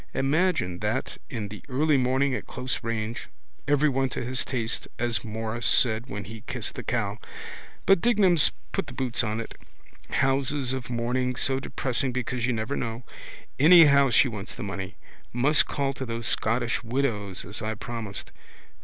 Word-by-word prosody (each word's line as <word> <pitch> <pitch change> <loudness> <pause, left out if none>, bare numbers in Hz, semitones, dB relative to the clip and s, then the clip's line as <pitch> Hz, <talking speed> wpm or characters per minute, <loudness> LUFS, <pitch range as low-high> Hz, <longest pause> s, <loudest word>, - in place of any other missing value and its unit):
Imagine 135 - +1
that 110 +5 -2
in 110 -5 -4
the 105 - -9
early 145 +3 +2
morning 130 +1 +2
at - - -4
close 125 0 -4
range. 115 0 -3 0.4
Everyone 140 -2 +2
to - - -4
his 130 +2 -1
taste 120 -4 -1
as 115 -4 0
Morris 110 +1 -3
said 115 0 +3
when 105 -4 -5
he 110 +2 -9
kissed - - -4
the - - -6
cow. - - -2 0.7
But 195 -3 +5
Dignam's 195 -9 +4 0.2
put 195 -5 -2
the 135 - -8
boots 125 -2 0
on 110 0 -2
it. 115 - -6 0.6
Houses 135 -1 +1
of 130 -3 -5
mourning 125 +1 -1
so 130 +2 +2
depressing 130 0 -1
because 125 -1 -2
you - - +1
never 115 +4 -2
know. 115 +1 -4 0.6
Anyhow 145 -3 +7
she 125 +3 +5
wants 105 -5 -6
the - - -6
money. 100 -1 -5 0.4
Must 140 +5 +4
call 140 -1 -1
to 130 - -5
those 115 0 -4
Scottish 120 +4 +1
Widows 115 -6 -2
as - - -3
I 110 +1 -2
promised. 110 -2 -6
125 Hz, 165 wpm, -26 LUFS, 115-135 Hz, 0.7 s, Anyhow